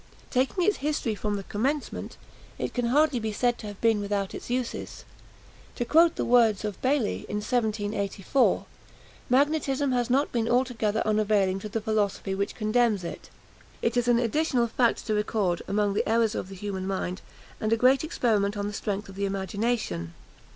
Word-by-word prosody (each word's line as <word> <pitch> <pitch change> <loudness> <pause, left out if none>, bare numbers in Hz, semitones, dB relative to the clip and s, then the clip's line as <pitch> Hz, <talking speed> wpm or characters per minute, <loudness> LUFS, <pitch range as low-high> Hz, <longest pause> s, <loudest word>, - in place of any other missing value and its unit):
Taking 265 +8 +1
its 415 +3 +2
history 290 -6 -1
from 210 0 -2
the 200 - -4
commencement, 270 +10 -3 0.4
it - - -3
can 245 -1 -1
hardly 285 +1 +3
be 220 -1 -2
said 240 +3 0
to 215 - -7
have 205 -1 -8
been 225 -2 +3
without 200 -1 -2
its - - -8
uses. 245 -1 -3 0.7
To 240 - -2
quote 330 +5 +5
the - - -1
words 230 -4 +4
of 210 -3 -5
Bailly, 260 -4 0
in - - -3
1784, 210 0 0 0.6
"Magnetism 280 0 +2
has 245 -1 0
not 275 +4 +2
been 230 -1 0
altogether 240 -4 +1
unavailing 210 -3 +2
to 215 - -7
the 225 - -2
philosophy 210 -3 -1
which 200 +1 -2
condemns 215 -2 +1
it: 170 - -7 0.5
it 230 +1 +1
is 245 -1 +1
an 240 -1 +5
additional 245 +1 +1
fact 235 +1 +1
to 215 - 0
record 210 -4 0
among 205 0 +1
the 205 - 0
errors 225 -1 +3
of 185 - -4
the 195 - -8
human 190 -1 -4
mind, 190 -1 -3 0.4
and 215 - -1
a 225 - +4
great 260 +4 +4
experiment 215 -9 0
on 200 - -2
the 205 - -4
strength 205 0 -3
of 195 - -10
the 200 +1 -2
imagination." 195 - -2
220 Hz, 180 wpm, -27 LUFS, 205-245 Hz, 0.7 s, quote